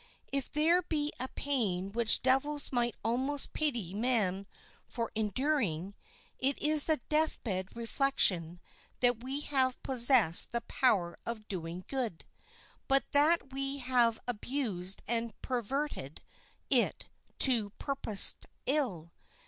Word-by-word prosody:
If 275 -2 -2
there 330 +4 +2
be 305 -4 -2
a 260 - 0
pain 205 -11 -2
which 230 +1 +2
devils 285 +3 +2
might 240 -2 0
almost 260 +6 +2
pity 240 - -1
man 205 -4 0 0.4
for 230 -2 -5
enduring, 215 - -2 0.5
it 270 +1 0
is 300 -1 +5
the 315 -1 +3
death 310 +1 +1
bed 190 -3 -4
reflection 200 - +1 0.4
that 245 -2 +2
we 270 +3 -3
have 260 -3 0
possessed 240 - +5
the 235 - -1
power 190 -12 0
of 220 -2 -6
doing 175 -1 -6
good, 245 -11 -4 0.6
but 270 -1 +2
that 290 -2 +2
we 275 +1 -3
have 245 -3 +1
abused 210 -6 -3
and 230 -1 -2
perverted 250 - -4 0.5
it - - +1 0.3
to 235 -6 +3
purposed 245 -7 +1 0.2
ill. 220 - 0
245 Hz, 120 wpm, -31 LUFS, 205-275 Hz, 0.6 s, is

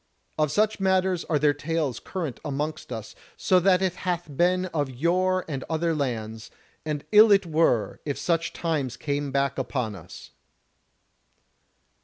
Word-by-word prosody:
Of 150 -2 +2
such 215 +4 +1
matters 190 -2 +1
are 155 - +1
there 145 0 +3
tales 150 -2 -2
current 165 -9 -5
amongst 150 0 -4
us 110 -2 -6
that - - -26 0.2
so 185 - +3
it 185 0 +3
hath 175 -5 -3
been 180 +3 +2
of 145 -4 0
yore 180 +7 +1
and 140 -4 -4
in - - -8
other 165 +1 0
lands; 115 -6 -3 0.3
and 150 -2 -4
ill 215 +1 +8
it 195 -2 +5
were 155 -9 +1
if 145 -2 -3
such 165 -1 0
times 150 -7 -2
came 145 -1 -2
back 140 0 0
upon 125 -4 -2
us." 90 -2 -12
155 Hz, 155 wpm, -25 LUFS, 140-180 Hz, 0.3 s, ill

